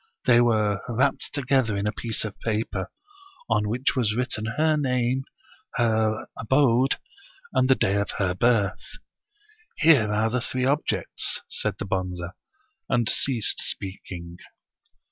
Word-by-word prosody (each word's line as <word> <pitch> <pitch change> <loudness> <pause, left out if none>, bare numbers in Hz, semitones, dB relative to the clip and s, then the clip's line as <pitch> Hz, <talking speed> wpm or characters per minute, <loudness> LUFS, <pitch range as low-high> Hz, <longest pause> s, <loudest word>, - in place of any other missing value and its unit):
They 120 -1 +6
were 110 -4 +2
wrapped 130 +4 0
together 130 -6 +1
in 100 - -2
a 105 - +1
piece 115 -1 -3
of 105 - -6
paper, 110 -4 -2 0.6
on 105 -2 +1
which 125 +5 0
was 110 -5 +1
written 120 -3 -2
her 155 0 +3
name, 130 -2 0 0.5
her 110 -2 +1
abode, 130 +1 +3 0.6
and 130 - +2
the 130 - +6
day 100 -3 +1
of 100 0 -1
her 95 -3 +1
birth. 100 -1 +1 0.8
Here 135 -10 +5
are 110 +2 +1
the 125 0 0
three 130 +2 -2
objects 145 +3 0
1 - - -35
'* - - -54
said - - -1
the - - -5
Bonze, 90 -2 -2 0.7
and 120 -2 +2
ceased 120 -4 +2
speaking. 90 -3 -5
115 Hz, 145 wpm, -25 LUFS, 105-130 Hz, 0.8 s, They